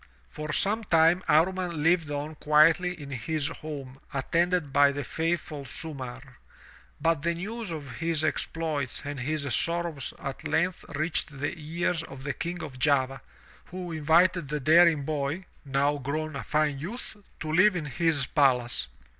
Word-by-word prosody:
For 150 Hz, 0 st, -5 dB
some 215 Hz, +6 st, +1 dB
time 165 Hz, -1 st, +4 dB
Amman 180 Hz, +4 st, +3 dB
Uved 165 Hz, 0 st, +2 dB
on 145 Hz, +2 st, -3 dB
quietly 160 Hz, +4 st, +4 dB
in 140 Hz, -1 st, -8 dB
his 150 Hz, +4 st, -1 dB
home 140 Hz, -5 st, -8 dB
attended 165 Hz, +2 st, 0 dB
by 145 Hz, 0 st, +6 dB
the 145 Hz, 0 st, -4 dB
faithful 160 Hz, -1 st, -2 dB
Sumarr. 130 Hz, -2 st, -5 dB, 0.6 s
But 165 Hz, -1 st, +1 dB
the 170 Hz, +2 st, 0 dB
news 215 Hz, +4 st, -5 dB
of 140 Hz, -7 st, -6 dB
his 165 Hz, +1 st, 0 dB
exploits 155 Hz, -4 st, -2 dB
and 145 Hz, -1 st, -4 dB
his 150 Hz, +4 st, -2 dB
sorrows 170 Hz, -2 st, 0 dB
at 135 Hz, +3 st, -6 dB
length 175 Hz, +4 st, 0 dB
reached 155 Hz, -1 st, -1 dB
the 145 Hz, +2 st, -2 dB
ears 165 Hz, +2 st, -2 dB
of 135 Hz, -5 st, -10 dB
the 145 Hz, 0 st, -2 dB
King 170 Hz, +3 st, -4 dB
of 135 Hz, -4 st, -8 dB
Java, 135 Hz, -1 st, +2 dB, 0.4 s
who 180 Hz, -1 st, -6 dB
invited 165 Hz, +1 st, +3 dB
the 150 Hz, 0 st, -1 dB
daring 160 Hz, +1 st, +5 dB
boy 150 Hz, +4 st, -2 dB
— -, -, -32 dB
now 140 Hz, +1 st, +1 dB
grown 155 Hz, +3 st, -3 dB
a 140 Hz, -, -4 dB
fine 150 Hz, -2 st, 0 dB
youth 220 Hz, -, -5 dB
— -, -, -34 dB
to 155 Hz, -, -3 dB
live 185 Hz, +3 st, +5 dB
in 165 Hz, -4 st, -2 dB
his 150 Hz, -1 st, +1 dB
palace. 125 Hz, -, +2 dB
155 Hz, 160 wpm, -28 LUFS, 140-170 Hz, 0.6 s, by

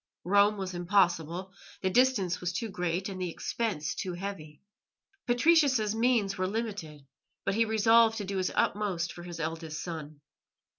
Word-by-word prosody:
Rome 205 Hz, +3 st, +4 dB
was 190 Hz, -1 st, -4 dB
impossible; 175 Hz, 0 st, +1 dB, 0.3 s
the 190 Hz, -, 0 dB
distance 225 Hz, -7 st, +2 dB
was 180 Hz, 0 st, -1 dB
too 225 Hz, +4 st, -3 dB
great 180 Hz, 0 st, -2 dB
and 190 Hz, -2 st, -6 dB
the 180 Hz, -, -1 dB
expense 170 Hz, -3 st, -2 dB
too 185 Hz, -, -4 dB
heavy. 175 Hz, -5 st, -7 dB, 0.6 s
Patricius's 250 Hz, -4 st, +3 dB
means 225 Hz, -4 st, +1 dB
were 185 Hz, -, +1 dB
limited, 195 Hz, -9 st, -5 dB, 0.4 s
but -, -, +1 dB
he 230 Hz, +3 st, +3 dB
resolved 225 Hz, +1 st, +4 dB
to 205 Hz, -, -3 dB
do 195 Hz, 0 st, -3 dB
his 185 Hz, -1 st, 0 dB
utmost 185 Hz, -5 st, 0 dB
for 175 Hz, -, -10 dB
his 175 Hz, -1 st, -8 dB
eldest 160 Hz, -1 st, -4 dB
son. 155 Hz, -4 st, -7 dB
190 Hz, 155 wpm, -29 LUFS, 175-220 Hz, 0.6 s, Rome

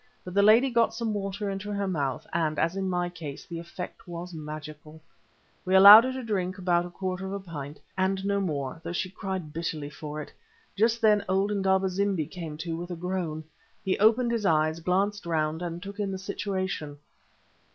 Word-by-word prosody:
But 180 Hz, -, -7 dB
the 200 Hz, -, +4 dB
lady 225 Hz, +6 st, +6 dB
got 230 Hz, -1 st, +2 dB
some 225 Hz, -2 st, -2 dB
water 200 Hz, 0 st, -3 dB
into 195 Hz, +1 st, -4 dB
her 200 Hz, -1 st, -1 dB
mouth, 140 Hz, -8 st, -2 dB
and, 160 Hz, -2 st, 0 dB
as 165 Hz, +3 st, +1 dB
in 190 Hz, -1 st, -1 dB
my 175 Hz, -1 st, 0 dB
case, 160 Hz, -5 st, -8 dB
the 170 Hz, -2 st, -6 dB
effect 175 Hz, +2 st, -8 dB
was 175 Hz, +1 st, -7 dB
magical. 155 Hz, 0 st, -8 dB, 0.6 s
We 185 Hz, +1 st, +1 dB
allowed 205 Hz, +4 st, +11 dB
her 260 Hz, -, -2 dB
to 260 Hz, 0 st, -5 dB
drink 185 Hz, -4 st, -2 dB
about 175 Hz, -2 st, +1 dB
a -, -, -10 dB
quarter 185 Hz, +1 st, -4 dB
of 190 Hz, -, -5 dB
a 200 Hz, -, -3 dB
pint, 150 Hz, -6 st, -8 dB, 0.2 s
and 190 Hz, +1 st, 0 dB
no 200 Hz, 0 st, +1 dB
more, 150 Hz, -4 st, -3 dB
though 170 Hz, +1 st, -4 dB
she 180 Hz, +1 st, -2 dB
cried 190 Hz, -6 st, -5 dB
bitterly 155 Hz, -3 st, -4 dB
for 150 Hz, +1 st, -7 dB
it. 150 Hz, -, -8 dB, 0.4 s
Just 225 Hz, +3 st, +2 dB
then 210 Hz, -2 st, +4 dB
old 195 Hz, +2 st, +2 dB
Indaba 190 Hz, -1 st, +2 dB
zimbi 190 Hz, -3 st, 0 dB
came 160 Hz, -2 st, -7 dB
to 165 Hz, -1 st, -2 dB
with 175 Hz, +2 st, -6 dB
a 175 Hz, -, -4 dB
groan. 170 Hz, -3 st, -3 dB, 0.4 s
He 190 Hz, -, +2 dB
opened 230 Hz, +3 st, +4 dB
his 230 Hz, -2 st, -1 dB
eyes, 155 Hz, -3 st, +2 dB
glanced 195 Hz, +3 st, 0 dB
round, 160 Hz, 0 st, 0 dB
and 175 Hz, 0 st, -5 dB
took 200 Hz, +1 st, -8 dB
in 205 Hz, -1 st, -1 dB
the 190 Hz, -, -3 dB
situation. 190 Hz, -6 st, -3 dB
185 Hz, 200 wpm, -27 LUFS, 165-200 Hz, 0.6 s, allowed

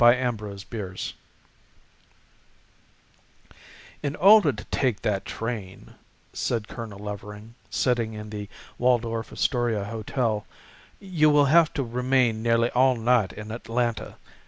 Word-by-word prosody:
THE 120 Hz, +1 st, +7 dB
OTHER 105 Hz, -3 st, -4 dB
LODGERS 95 Hz, -2 st, -6 dB, 2.9 s
"IN 145 Hz, -1 st, -2 dB
order 200 Hz, -4 st, +7 dB
to 105 Hz, -, -8 dB
take 125 Hz, -6 st, 0 dB
that 100 Hz, -2 st, 0 dB
train," 110 Hz, -5 st, -6 dB, 0.4 s
said 115 Hz, -3 st, -2 dB
Colonel 110 Hz, -4 st, -7 dB
Levering, 105 Hz, +2 st, -8 dB, 0.2 s
sitting 120 Hz, -3 st, 0 dB
in 105 Hz, 0 st, -8 dB
the 105 Hz, -1 st, -6 dB, 0.3 s
Waldorf 115 Hz, -2 st, +1 dB
Astoria 120 Hz, -5 st, 0 dB
hotel, 110 Hz, 0 st, -2 dB, 0.5 s
"you 170 Hz, -6 st, +2 dB
will 145 Hz, -1 st, +5 dB
have 165 Hz, -2 st, +6 dB
to 140 Hz, -, 0 dB
remain 125 Hz, -1 st, +1 dB
nearly 115 Hz, 0 st, +2 dB
all 130 Hz, +1 st, +4 dB
night 115 Hz, -4 st, +2 dB
in 105 Hz, 0 st, -8 dB
Atlanta. 115 Hz, 0 st, -2 dB
115 Hz, 115 wpm, -25 LUFS, 105-125 Hz, 2.9 s, THE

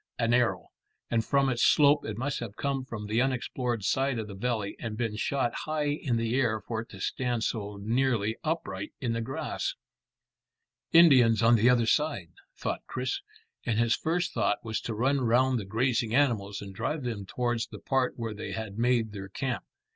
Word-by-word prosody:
An 115 Hz, 0 st, +1 dB
arrow, 120 Hz, -1 st, +1 dB, 0.4 s
and 115 Hz, -1 st, +2 dB
from 140 Hz, +3 st, +2 dB
its 120 Hz, -3 st, 0 dB
slope 145 Hz, -1 st, +5 dB
it 105 Hz, -1 st, -4 dB
must 135 Hz, +3 st, -2 dB
have 110 Hz, -4 st, -6 dB
come 140 Hz, -2 st, -1 dB
from 115 Hz, -5 st, -6 dB
the 110 Hz, +3 st, +1 dB
unexplored 125 Hz, -3 st, -1 dB
side 135 Hz, +5 st, +1 dB
of 110 Hz, -2 st, -3 dB
the 100 Hz, -, -8 dB
valley, 110 Hz, -1 st, -2 dB
and 110 Hz, -2 st, -5 dB
been 115 Hz, -3 st, -1 dB
shot 125 Hz, +3 st, 0 dB
high 155 Hz, -1 st, -2 dB
in 145 Hz, -5 st, -1 dB
the 115 Hz, 0 st, -1 dB
air 120 Hz, -4 st, +2 dB
for 110 Hz, +2 st, -4 dB
it 115 Hz, -, -12 dB
to 95 Hz, -, -11 dB
stand 120 Hz, +3 st, -1 dB
so 105 Hz, -3 st, -3 dB
nearly 115 Hz, 0 st, +1 dB
upright 155 Hz, -, -3 dB
in 120 Hz, -3 st, -1 dB
the 115 Hz, -, -1 dB
grass. 135 Hz, +3 st, -3 dB, 1.2 s
"Indians 130 Hz, -10 st, +6 dB
on 115 Hz, +1 st, +6 dB
the 115 Hz, +1 st, +5 dB
other 120 Hz, -2 st, +4 dB
side," 115 Hz, -, 0 dB, 0.3 s
thought -, -, -3 dB
Chris, 130 Hz, 0 st, -2 dB, 0.4 s
and 115 Hz, -3 st, 0 dB
his 115 Hz, 0 st, +3 dB
first 170 Hz, +2 st, -1 dB
thought 105 Hz, -, +1 dB
was 110 Hz, -1 st, -2 dB
to 115 Hz, -, -4 dB
run 135 Hz, +5 st, +1 dB
round 125 Hz, +1 st, +3 dB
the 100 Hz, -, -5 dB
grazing 115 Hz, +2 st, 0 dB
animals 105 Hz, -8 st, +1 dB
and 100 Hz, -1 st, -8 dB
drive 150 Hz, +9 st, -2 dB
them 110 Hz, -6 st, -4 dB
towards 120 Hz, 0 st, -1 dB
the -, -, -9 dB
part 130 Hz, -2 st, 0 dB
where 115 Hz, -2 st, -3 dB
they 105 Hz, -, -6 dB
had 110 Hz, -1 st, -5 dB
made 120 Hz, -2 st, +2 dB
their 95 Hz, -2 st, -7 dB
camp. 130 Hz, +5 st, -3 dB
120 Hz, 190 wpm, -29 LUFS, 110-130 Hz, 1.2 s, Indians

